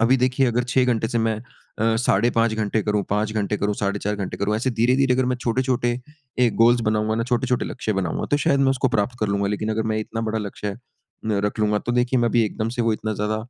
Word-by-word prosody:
अभी 120 +3 +4
देखिए 130 +1 +2
अगर 120 +1 +1
6 130 -1 +4
घंटे 115 -3 0
से 120 0 -1
मैं 110 -1 +1
अ, 115 -1 -3
5:30 115 0 +2
घंटे 110 0 0
करूँ, 105 -1 0
5 105 +1 0
घंटे 105 -1 -1
करूंँ, 105 0 -1
4:30 105 +1 -2
घंटे 100 -2 -4
करूँ। 105 +1 0
ऐसे 130 +4 0
धीरे-धीरे 125 +3 +2
अगर 130 0 +1
मैं - - -6
छोटे-छोटे 120 0 0 0.5
एक 115 - -1
गोल्स 120 +1 +5
बनाऊँगा 110 0 0
ना 115 - 0
छोटे-छोटे 125 0 0
लक्ष्य 110 -4 -3
बनाऊँगा 95 -4 -2
तो 145 - +4
शायद 140 0 +3
मैं 135 - +4
उसको 130 0 +1
प्राप्त 120 +1 -1
कर 110 - +1
लूँगा। 100 0 0
लेकिन 105 +1 -2
अगर 110 0 0
मैं 110 - 0
इतना 110 +1 -4
बड़ा 110 - -1
लक्ष्य 105 0 -5
अ, 100 - -7 0.7
रख 105 - -2
लूँगा 105 0 +2
तो 120 - -3
देखिए 125 +1 +2
मैं 120 - +2
अभी 115 0 +3
एकदम 110 +1 -2
से 120 +1 -2
वो 115 -1 +2
इतना 110 0 -3
ज़्यादा 105 +1 -1
115 Hz, 240 wpm, -23 LUFS, 105-125 Hz, 0.7 s, गोल्स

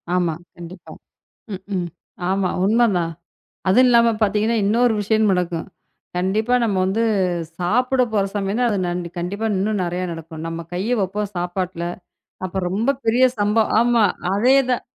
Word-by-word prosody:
ஆமா. 175 -3 +1 0.2
கண்டிப்பா. 175 +1 -11 0.6
ம்ஹ்ம். 190 -2 -4 0.4
ஆமா. 190 -1 +1 0.2
உண்மைதான். 200 -6 +2 0.6
அது 190 - +5
இல்லாம 235 -2 +5
பார்த்தீங்கன்னா 215 +2 +2
இன்னொரு 235 +3 +3
விஷயமும் 215 0 +2
நடக்கும். 175 -2 -2 0.5
கண்டிப்பா 210 +6 0
நம்ம 205 -4 0
வந்து 195 +4 0 0.6
சாப்பிட 250 +8 +2
போற 205 -2 +2
சமயம்தான் 205 +5 0
அது 205 - 0
கண் 175 +1 -2 0.2
கண்டிப்பா 200 +6 -3
இன்னும் 205 +1 0
நறைய 180 +1 -2
நடக்கும். 165 -1 -8
நம்ம 165 0 -5
கைய 205 +8 0
வைப்போம் 200 +2 -2
சாப்பாட்ல. 175 0 -3 0.6
அப்ப 190 +1 -3
ரொம்ப 215 +8 0 0.2
பெரிய 240 +3 +4
சம்ப 210 +2 +2 0.2
ஆமா 240 -1 +3 0.3
அதேதான். 250 +4 +3
200 Hz, 130 wpm, -21 LUFS, 180-230 Hz, 0.6 s, அது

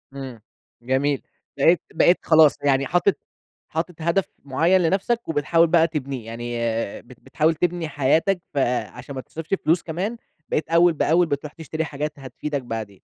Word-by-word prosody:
إمم، 130 -5 -7 0.4
جميل، 135 +3 0 0.4
بقيت 165 +5 +4
بقيت 175 - +4
خلاص 160 -2 +6
يعني 140 -1 +2
حاطط 175 +3 +2 0.5
حاطط 165 +2 -3
هدف 170 +4 +1 0.2
معيّن 165 +7 +3
لنَفسك 195 +7 0
وبتحاول 160 +2 +3
بقى 165 0 +4
تبنيه، 140 -6 -4
يعني 120 +1 -6 0.5
بت 120 0 -16
بتحاول 160 +1 0
تبني 175 -1 -1
حياتك 160 +7 +1
فعشان 125 -1 -2
ما 130 - -4
تصرفش 165 +7 -7
فلوس 165 +2 +3
كمان 190 +8 -3 0.3
بقيت 155 - -1
أول 170 0 +5
بأول 165 +3 +3
بتروح 145 0 -4
تشتري 160 0 -4
حاجات 150 0 -4
هتفيدك 135 +2 -4
بعدين. 110 -5 -6
155 Hz, 145 wpm, -23 LUFS, 135-170 Hz, 0.5 s, خلاص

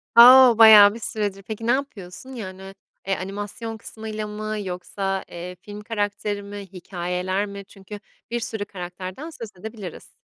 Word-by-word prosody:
A 255 +2 +10
o, 230 - -3
bayağı 215 -2 +9
bir 230 - -8
süredir. 205 -3 -3
Peki 220 +2 -6
ne - - +4
yapıyorsun? 255 -4 -4
Yani, 190 -3 -8 0.3
eee, 195 - +1
animasyon 205 +4 -6
kısmıyla 215 0 -6
mı 215 +1 -4
yoksa, 195 +1 -3
eee, 180 +1 -7
film 205 +3 -10
karakteri 205 -1 -3
mi, 200 +1 -8 0.2
hikâyeler 180 +2 -3
mi? 200 -1 -9
Çünkü 195 +1 -11 0.3
bir 240 - -1
sürü 220 -2 -4
karakterden 185 - -7
söz 230 -9 -8
edebiliriz. 210 -4 -8
205 Hz, 150 wpm, -23 LUFS, 190-220 Hz, 0.3 s, A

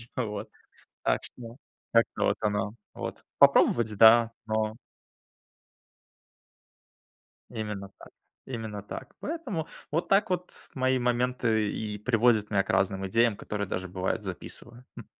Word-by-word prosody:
А, 125 - 0
вот. 105 0 -5 0.6
Так - - +2
что 115 0 -10 0.4
как-то 115 0 +2
вот - - +2
оно 105 0 -1 0.2
вот. - - -6 0.2
Попробовать- 110 -2 +5
да, 115 +1 +7
но 110 0 0 2.8
Именно 105 -4 -5
так. - - -13 0.4
Именно 110 -5 -5
так. - - -8
Поэтому 275 - -4 0.2
вот 165 +3 0
так 195 0 +3
вот 180 0 -2 0.2
мои 130 -1 +1
моменты 120 -3 +1
и 105 -1 -4
приводят 115 -1 +2
меня 100 -2 +2
к - - -18
разным 95 0 +1
идеям, 115 +1 +3
которые 100 -1 -4
даже, 95 0 -3
бывает, 95 +4 -2
записываю, 120 +6 -8
м. - - -9
110 Hz, 125 wpm, -28 LUFS, 105-125 Hz, 2.8 s, да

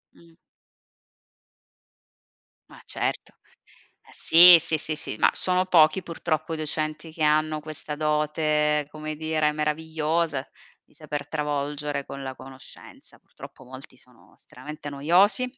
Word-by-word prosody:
Mh. 170 -1 -21 2.4
Ma - - -16
certo. - - -4 0.7
Eh - - -22
sì, 175 +1 +8
sì, 160 -1 -1
sì, 155 0 -3
sì 150 - -6
ma - - +4
sono 185 0 +3
pochi 165 0 +3
purtroppo 160 -1 -4
docenti 155 +1 -3
che 160 - -6
hanno 155 0 +1
questa 155 0 -8
dote, 150 0 0
come 155 0 -7
dire, 155 0 -1
meravigliosa 155 -1 -2 0.4
di - - -31
saper 150 -2 -7
travolgere 145 -1 -3
con 140 - -9
la 130 -1 -6
conoscenza. 130 0 -15
Purtroppo 130 - -15
molti 130 +1 -13
sono 125 -1 -23
estremamente 145 +3 -11
noiosi, 180 - +2
155 Hz, 120 wpm, -24 LUFS, 145-160 Hz, 2.4 s, sì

